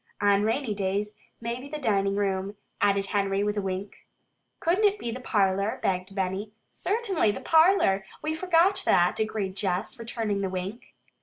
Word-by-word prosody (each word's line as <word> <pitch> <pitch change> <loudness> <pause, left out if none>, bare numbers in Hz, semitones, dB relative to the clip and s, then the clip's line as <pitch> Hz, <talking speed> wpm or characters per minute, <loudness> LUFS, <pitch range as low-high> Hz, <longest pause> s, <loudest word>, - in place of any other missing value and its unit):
"On 200 -1 +4
rainy 225 +2 0
days, 205 +1 -2 0.2
maybe 240 +4 -5
the 300 - -4
dining 200 -7 +1
room," 195 0 -1 0.3
added 200 -1 +3
Henry 195 0 0
with 210 0 0
a 205 - 0
wink. 190 +1 -4 0.6
"Couldn't 365 +6 +2
it 410 0 +3
be 235 - -4
the 250 - -5
parlor?" 200 0 +1
begged 185 +1 -1
Benny. 195 +2 -2
"Certainly, 385 - 0
the - - -6
parlor! 320 - +4 0.2
We 310 +1 -1
forgot 360 +3 +3
that," 175 0 +3
agreed 215 -3 -2
Jess, 195 +4 -2
returning 225 -3 -2
the 190 - -1
wink. 190 +5 -6
205 Hz, 160 wpm, -27 LUFS, 195-255 Hz, 0.6 s, On